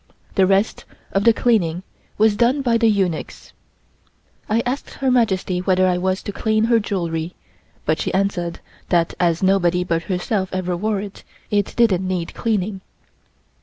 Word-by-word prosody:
The 190 -2 +3
rest 195 +3 +1 0.3
of 195 +2 0
the 230 - +8
cleaning 190 -8 +1 0.3
was 215 0 +4
done 245 +6 +2
by 235 -2 +2
the 230 -1 +4
eunuchs. 190 -6 -2 1.0
I 225 +2 +2
asked 255 +3 -4
Her 265 -1 0
Majesty 195 -7 +1
whether 185 0 +2
I 180 -1 +1
was 185 +1 -1
to - - -4
clean 220 +1 0
her 230 0 +4
jewelry, 170 -5 -3 0.5
but 155 +1 +1
she - - -1
answered 185 -3 -1 0.3
that 170 -2 +2
as 170 0 +1
nobody 180 -2 +3
but 165 -2 -1
herself 190 +1 -1
ever 185 -1 -1
wore 210 +3 -1
it, 200 -1 -9 0.3
it 205 -1 0
didn't 190 -6 +2
need 180 -2 -3
cleaning. 205 -3 -1
195 Hz, 160 wpm, -21 LUFS, 180-220 Hz, 1.0 s, the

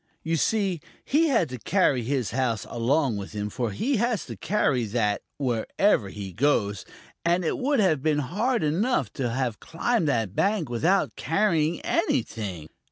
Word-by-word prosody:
You 165 +1 0
see, 190 -1 0 0.2
he 320 +4 +3
had 230 - +2
to 125 -1 -6
carry 145 - +2
his 125 -1 -1
house 120 -3 -1
along 125 0 +1
with 100 +1 -7
him, 105 0 -3
for 120 +1 -2
he 245 - 0
has 235 -1 0
to - - -7
carry 135 - +1
that 105 -1 0 0.2
wherever 125 - +1
he 95 -2 -7
goes, 105 - +1 0.4
and 175 +1 +2
it - - -1
would 275 +1 +1
have 170 -9 +3
been 155 0 +1
hard 205 - 0
enough 160 - 0
to 125 -3 -2
have 120 -2 -2
climbed 170 +3 0
that 115 -8 0
bank 195 - +1
without 165 +12 +1
carrying 165 -3 +1
anything. 95 -9 -1
145 Hz, 165 wpm, -26 LUFS, -, 0.4 s, he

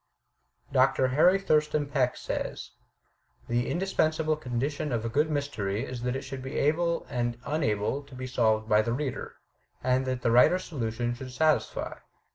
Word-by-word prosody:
Dr. 130 0 +3
Harry 175 +8 +5
Thurston 150 -5 +1
Peck 135 -3 0
says: - - -4 0.8
"The 120 +1 0
indispensable 160 -4 +1
condition 140 +2 -3
of 115 -2 -1
a - - -1
good 150 +6 +1
mystery 115 -9 -2
is 125 -2 -6
that 125 +1 -1
it 135 - -4
should 135 0 -6
be 135 +1 -5
able 170 +3 +1
and 120 -1 -2
unable 135 -4 0
to 140 -2 -13
be 130 0 -5
solved 110 -4 +1
by 105 -1 +5
the 115 +2 -1
reader, 135 -1 -4 0.5
and 130 +1 +1
that 130 -1 -2
the 115 - +3
writer's 125 +10 +5
solution 120 -4 -2
should 130 +1 -8
satisfy. 155 +4 0
130 Hz, 160 wpm, -28 LUFS, 120-150 Hz, 0.8 s, Harry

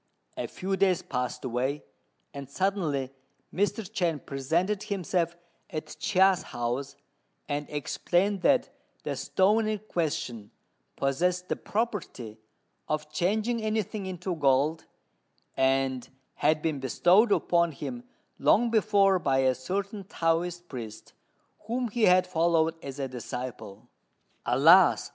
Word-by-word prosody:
A - - -3
few 195 +1 -3
days 190 -2 +2
passed 125 0 -3
away, 130 +4 -2 0.5
and 140 -2 -8
suddenly 155 -7 -1 0.4
Mr. 205 +3 0
Chên 175 -7 -2
presented 170 +9 -1
himself 180 -5 -1 0.3
at 155 0 -6
Chia's 190 -2 +3
house, 125 +4 -4 0.5
and 145 0 -3
explained 175 +7 0
that 270 +1 +3 0.3
the - - -3
stone 215 +4 +2
in 215 0 0
question 150 - -3 0.5
possessed 180 +7 0
the - - +1
property 200 - -4 0.5
of 150 0 -3
changing 215 +8 0
anything 215 -2 -2
into 185 0 -4
gold, 145 +2 +2 0.7
and 130 -1 +1 0.2
had 155 0 +1
been 155 -4 -1
bestowed 180 - +4
upon 170 -3 +2
him 240 - -6 0.4
long 235 +2 +3
before 200 -4 +3
by 135 -5 +1
a 130 - +4
certain 195 - -4
Taoist 175 0 -1
priest, 110 -6 -8 0.5
whom 240 +1 -1
he 220 +1 +2
had 180 0 +5
followed 165 -2 +2
as 140 -1 -7
a 135 -1 -2
disciple. 125 -4 -7 0.6
"Alas!" 160 +9 +6
170 Hz, 120 wpm, -28 LUFS, 135-195 Hz, 0.7 s, Alas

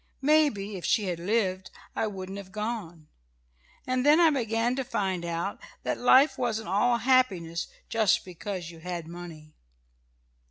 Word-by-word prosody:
Maybe 270 -10 +2
if 175 - -9
she 225 -3 +2
had 170 -2 -3
lived 190 -1 0 0.3
I - - 0
wouldn't 195 -1 -6
have 190 -1 -11
gone. 210 -7 -5 0.8
And 255 0 0
then 295 +3 +6
I 330 -2 +6
began 235 -2 0
to 270 - 0
find 190 -7 -2
out 170 +3 -3 0.2
that - - -2
life 260 +4 +5
wasn't 225 -5 -1
all 235 +5 +3
happiness 210 -10 +1 0.2
just 220 -4 +2
because 180 -1 -6
you 165 - -13
had 170 -1 -5
money. 165 -3 -10
200 Hz, 150 wpm, -28 LUFS, 175-240 Hz, 0.8 s, then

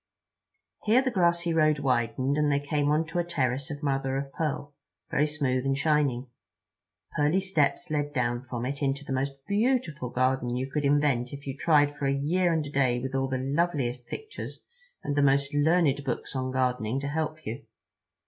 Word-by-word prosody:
Here 235 +5 +5
the 260 - 0
grassy 170 -3 +2
road 155 -2 +4
widened, 130 0 0
and 150 -1 +2
they 140 - +2
came 145 0 0
onto 160 +3 +1
a - - +2
terrace 135 -5 -1
of 145 +1 -6
mother 135 -1 0
of 135 0 -5
pearl, 150 -2 -3 0.4
very 150 +2 +2
smooth 135 -4 0
and 135 0 0
shining. 145 -4 +1 0.9
Pearly 150 +4 +3
steps 155 -8 0
led 145 -1 0
down 120 -3 0
from 125 -2 -5
it 140 +3 -4
into 140 +1 -1
the 135 - -3
most 135 +1 -1
beautiful 200 - 0
garden 130 -1 0
you 130 +1 -2
could 145 +1 -2
invent 140 -4 +2
if 140 0 -8
you 135 -1 -4
tried 145 -1 +3
for 140 - -2
a - - +2
year 170 +6 +1
and 160 -2 0
a 145 - -7
day 130 -4 +2
with 130 +2 -4
all 135 0 +1
the 130 -1 -1
loveliest 135 -3 -1
pictures 440 0 -7 0.4
and 145 - -2
the 145 - +3
most 140 0 +3
learned 145 -1 +3
books 135 - -4
on 130 0 -1
gardening 125 -2 0
to 140 - -4
help 155 +1 -3
you. 110 +2 -5
140 Hz, 185 wpm, -28 LUFS, 130-155 Hz, 0.9 s, Here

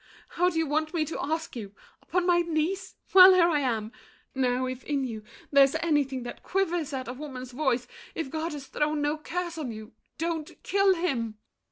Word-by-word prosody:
How 355 +1 +2
do 335 - -4
you 325 - +2
want 310 +3 -1
me 315 -2 +1
to 320 - -5
ask 320 +1 -3
you? 205 -4 -7 0.3
Upon 360 -1 -1
My 350 -1 +4
knees? 340 +3 -1 0.2
Well, 375 0 +10
here 345 -2 +5
I 315 -4 +2
am! 225 -5 -1 0.4
Now 255 -1 +1
if 255 0 -5
In 285 -2 -1
you 225 -4 -4 0.3
there's 280 0 +6
anything 290 -6 0
that 240 - -8
quivers 350 -5 -1
at 260 -3 -4
A 250 - -4
woman's 260 -2 -7
voice, 250 -2 0 0.3
if 300 -5 -4
God 320 0 -3
has 285 -2 -7
thrown 300 +2 -1
no 295 +1 +1
curse 345 +1 -4
On 270 -6 -3
you—don't 310 +9 -6
kill 395 -1 +3
him! 240 -11 -2
300 Hz, 190 wpm, -27 LUFS, 260-335 Hz, 0.4 s, Well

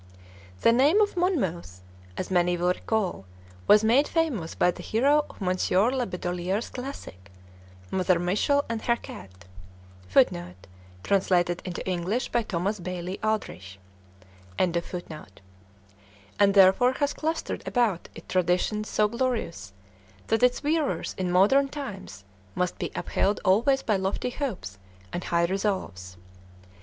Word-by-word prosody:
The - - +5
name 280 - +4
of 415 -2 +2
"Monmouth," 185 - -1 0.3
as 185 - -4
many 175 -1 +2
will 175 +1 +1
recall, 190 - -1 0.4
was 210 +1 +6
made 245 +7 +4
famous 280 - -1
by 180 - +3
the - - -10
hero 285 +6 +2
of - - -15
Monsieur 185 +3 +1
La 260 -2 -1
Bedolierre's 180 +2 -3
classic, 175 - -8 0.6
"Mother 185 -1 +2
Michel 205 - +1
and 230 -1 -3
her 235 - +2
Cat," 95 - -12 0.6
[Footnote: 90 0 +1 0.4
Translated 180 -3 +1
into 180 0 -5
English 185 +7 -1
by 240 - +1
Thomas 200 0 -2
Bailey 180 +1 -5
Aldrich.] 195 - -3 0.8
and 180 -2 +1 1.7
therefore 195 +6 +5
has 285 +2 -1
clustering 320 +1 -3
about 225 -8 0
it - - -12
traditions 185 +4 0
so 210 - +2
glorious 230 - -3 0.6
that 225 - +2
its 250 +2 +2
wearers 305 -1 0
in 185 -1 -2
modern 210 +10 +4
times 200 - -8 0.3
must 180 -1 -2
be - - -2
upheld 200 +1 0
always 240 +8 +3
by 210 -3 +1
lofty 190 +6 -2
hopes 190 - -5 0.3
and 180 - -4
high 170 0 +2
resolves. 170 - -3
195 Hz, 125 wpm, -26 LUFS, 175-245 Hz, 1.7 s, was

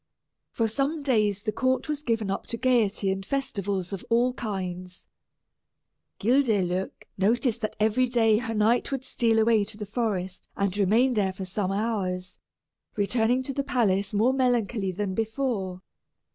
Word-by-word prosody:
For 230 - 0
some 280 +7 -1
days 210 -7 +1
the 215 - -1
court 260 +4 0
was 300 -1 -2
given 225 -7 -1
up - - -4
to 230 - -4
gaiety 225 -6 +2
and 195 0 -3
festivals 200 -7 -2
of 195 - -5
all 240 +2 +3
kinds. 185 -5 -5 1.1
Guildeluec 205 -7 +2 0.3
noticed 235 +4 +1
that 215 - -3
every 220 +4 +2
day 225 -3 +3
her 225 -2 -4
knight 220 +5 +2
would 270 -1 -2
steal 230 -3 +1
away 220 -1 +4
to 205 - -8
the 210 - -5
forest 200 -4 -3
and 200 -1 0
remain 220 +6 +3
there 200 -4 +1
for 190 0 -6
some 190 0 -2
hours, 195 -4 -2 0.6
returning 225 +5 +2
to 275 - -3
the 280 - -1
palace 200 -7 +1
more 220 +5 +3
melancholy 240 -6 +1
than 190 +1 -3
before. 220 -4 -2
220 Hz, 155 wpm, -26 LUFS, 195-245 Hz, 1.1 s, away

